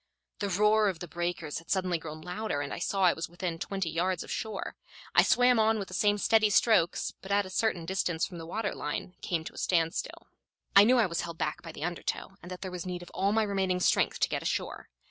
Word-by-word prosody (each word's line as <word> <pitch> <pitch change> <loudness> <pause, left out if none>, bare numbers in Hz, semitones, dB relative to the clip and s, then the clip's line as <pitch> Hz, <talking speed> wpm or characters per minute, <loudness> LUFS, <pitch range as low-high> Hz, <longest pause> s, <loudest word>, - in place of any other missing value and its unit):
The 200 - -1
roar 210 +2 +4
of 185 - -4
the 175 - -7
breakers 170 -2 -3
had 165 - -19
suddenly 185 -3 +1
grown 155 -1 -8
louder, 180 -2 -3
and 140 - -4
I - - -5
saw 195 -1 0
I 180 - +6
was 165 +1 -5
within 175 -1 -4
twenty 195 -1 -3
yards 180 +1 0
of - - -9
shore. 215 -3 -4 0.4
I - - +7
swam 245 -1 +4
on 220 0 +3
with 195 -3 -5
the - - -9
same 205 +2 +2
steady 215 +1 +4
strokes, 205 -5 +3
but 190 - -8
at 200 0 +3
a 185 - -9
certain 190 -5 0
distance 175 -2 0
from 175 -3 -9
the 165 - -8
water 205 +3 -2
line 150 +4 -4
came 170 -3 -1
to - - -8
a - - -8
standstill. 165 -2 -1 0.5
I 200 +1 +9
knew 250 +3 +5
I 235 - +5
was 170 -3 -2
held 170 -1 -6
back - - -2
by 165 - -8
the 155 - -8
undertow, 175 +2 -3
and 180 - -10
that 180 -1 -7
there 190 -1 -5
was 180 -1 -5
need 180 -1 -5
of - - -13
all 195 +2 +1
my 220 +1 +3
remaining 190 -3 0
strength - - +2
to - - +3
get - - -2
ashore. - - -3
185 Hz, 245 wpm, -29 LUFS, 170-205 Hz, 0.5 s, I